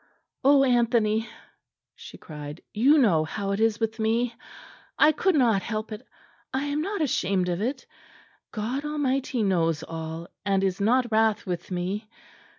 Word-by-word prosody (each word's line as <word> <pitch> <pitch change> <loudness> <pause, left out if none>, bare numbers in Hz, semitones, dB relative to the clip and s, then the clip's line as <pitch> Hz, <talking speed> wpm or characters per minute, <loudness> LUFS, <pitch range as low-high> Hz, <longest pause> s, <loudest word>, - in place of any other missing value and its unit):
"Oh, 275 0 +6
Anthony!" 235 -3 +2 0.6
she - - -12
cried, 150 0 -9
"you 265 +8 +5
know 190 - +4
how 195 +5 -3
it 200 - -1
is 225 0 +2
with 225 0 -2
me. 230 +2 +1 0.6
I 305 - +6
could 355 +4 +1
not 230 -8 +3
help 215 +1 -4
it. 215 +1 -6 0.5
I 265 +1 -1
am 290 +1 -1
not 400 +2 -3
ashamed 190 -9 0
of 175 +2 -2
it. 255 +6 -3 0.7
God 240 +6 -3
Almighty 275 -5 -1
knows 165 -5 +1
all, 165 +1 -6 0.2
and 195 -1 +1
is 190 0 -1
not 240 +3 +2
wrath 220 -1 +2
with 180 -3 -4
me. 190 +4 -3
220 Hz, 155 wpm, -26 LUFS, 195-260 Hz, 0.7 s, Oh